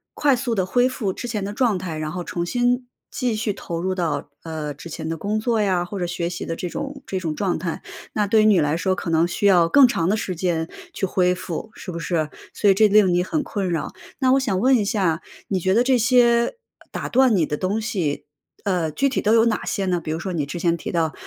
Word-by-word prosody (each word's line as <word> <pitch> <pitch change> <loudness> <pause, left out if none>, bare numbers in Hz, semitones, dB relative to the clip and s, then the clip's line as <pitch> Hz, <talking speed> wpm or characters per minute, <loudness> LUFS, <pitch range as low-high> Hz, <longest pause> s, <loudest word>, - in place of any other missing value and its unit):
快 285 -3 +3
速 240 -2 -2
地 190 -2 +1
恢 245 +5 +2
复 210 -8 -2
之 245 - -6
前 210 -4 -3
的 205 - -4
状 230 -5 +2
态， 170 -4 -5
然 155 0 -3
后 180 0 -4
重 170 0 -3
新 245 +5 0 0.2
继 245 -4 -1
续 215 -2 -1
投 170 -2 -5
入 185 +2 -1
到， 165 -5 -2
呃， 155 -3 -5
之 165 +4 -10
前 160 - -6
的 165 - -2
工 205 +6 -2
作 225 -1 +1
呀， 185 -3 +1
或 195 +2 -6
者 175 - -1
学 170 -1 -2
习 175 0 -5
的 165 - -3
这 180 - -4
种 280 +3 -6
这 190 - -3
种 160 -4 -3
状 190 -5 -1
态。 170 -1 -4 0.3
那 210 -1 +1
对 215 +2 +4
于 - - +3
你 205 -5 +5
来 150 +1 +1
说 185 +2 0
可 170 - -4
能 165 +1 +3
需 205 - -2
要 175 -4 +5
更 275 +2 +7
长 170 -6 0
的 215 - +2
时 185 -4 -3
间 165 -2 -1 0.2
去 195 - -2
恢 180 -1 +2
复， 185 +4 -5
是 180 - -7
不 170 - -5
是？ 155 -2 -1 0.2
所 205 - 0
以 195 - +7
这 215 +2 +5
令 200 -3 +5
你 180 0 +2
很 300 - -1
困 200 - -3
扰。 160 -3 -2 0.3
那 260 -1 +3
我 270 - +4
想 200 -8 0
问 260 +4 +4
一 215 - +2
下， 190 -6 0 0.3
你 190 -2 0
觉 190 +3 +1
得 240 - +4
这 260 0 +3
些， 235 - +4 0.2
呃， - - -22
打 - - -4
断 255 -3 +4
你 165 -4 +3
的 150 - -2
东 200 +4 -1
西， 190 -10 -2 0.4
呃， 175 -5 0
具 275 - +1
体 260 - -1
都 215 +2 +3
有 230 0 +5
哪 225 - 0
些 195 - -1
呢？ 180 -2 +1
比 155 - -4
如 160 - -2
说 190 +1 -4
你 150 -4 -1
之 160 +5 -6
前 170 0 +2
提 - - -5
到， 165 -2 0
190 Hz, 280 characters per minute, -22 LUFS, 170-225 Hz, 0.4 s, 更